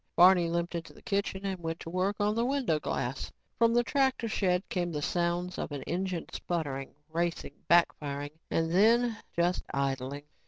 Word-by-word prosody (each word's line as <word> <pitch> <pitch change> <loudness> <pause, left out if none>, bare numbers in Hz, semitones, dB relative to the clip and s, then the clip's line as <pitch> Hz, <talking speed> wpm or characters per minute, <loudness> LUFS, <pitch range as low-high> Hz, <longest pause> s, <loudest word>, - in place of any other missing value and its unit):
Barney 180 -1 +7
limped 170 +1 -1
into 170 -1 -5
the - - -16
kitchen 200 -1 -1
and 190 -2 -2
went 165 -1 -4
to 165 - -7
work 185 +3 +1
on 205 +1 +2
the 230 +2 +1
window 255 - +1
glass. 125 -2 -3 0.3
From 230 -1 +5
the 240 +1 +4
tractor 265 -2 +1
shed 185 -3 +1
came 175 -2 -1
the 150 - -2
sounds 175 +2 -1
of - - -3
an 140 -2 -4
engine 180 -1 -2
spluttering, 145 -6 -3
racing, 170 +1 -2 0.2
backfiring 145 -4 +2 0.2
and 165 0 0
then, 225 +5 +4 0.2
just 175 +1 +1
idling. 140 0 -2
175 Hz, 170 wpm, -30 LUFS, 165-200 Hz, 0.3 s, Barney